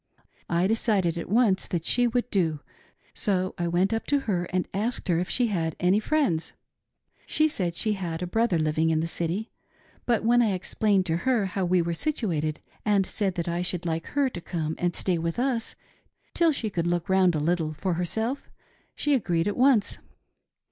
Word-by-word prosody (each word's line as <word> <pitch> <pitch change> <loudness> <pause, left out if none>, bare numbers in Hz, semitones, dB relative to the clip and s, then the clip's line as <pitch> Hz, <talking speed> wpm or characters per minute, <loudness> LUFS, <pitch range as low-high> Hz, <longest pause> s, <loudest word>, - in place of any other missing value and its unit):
I 170 +1 +2
decided 200 -5 +1
at 170 - -6
once 210 -3 +3
that 170 -2 -3
she 245 0 +3
would 245 +1 0
do, 160 -6 0 0.5
so 185 -2 0
I 175 - 0
went 180 +4 +1
up 225 - -2
to 285 -1 +2
her 180 -8 -1
and 180 +1 -2
asked 220 +6 -2
her 170 -1 +3
if 180 - -2
she 250 - +3
had 165 -8 -1
any 180 +3 +3
friends. 220 - 0 0.7
She 310 - +3
said 180 - -2
she 215 -2 +2
had 175 -3 -4
a - - -1
brother 225 0 +1
living 155 +1 +1
in 160 -1 +2
the - - -1
City; 170 +6 -3 0.6
but 235 -4 +2
when 240 +2 +4
I 220 -4 +2
explained 190 +1 +1
to 165 -2 0
her 235 +1 +1
how 190 0 -2
we 180 0 +2
were 170 0 -2
situated 165 - -1 0.2
and 205 -2 +2
said 195 -2 -1
that 170 -1 -3
I 170 +1 -1
should 180 -1 -1
like 165 -1 -2
her 285 -1 +1
to 180 -9 -6
come 160 -3 -3
and 175 -1 0
stay 180 -3 0
with 165 0 -2
us 245 -2 0 0.6
till 335 -2 +4
she 230 -7 -3
could 170 -2 -1
look 175 0 -1
round 190 -3 +3
a - - 0
little 160 0 0
for 170 +4 -2
herself, 220 +10 -2 0.5
she 295 - +1
agreed 175 -9 +1
at 205 - -1
once. 250 -5 +3
185 Hz, 195 wpm, -26 LUFS, 170-225 Hz, 0.7 s, when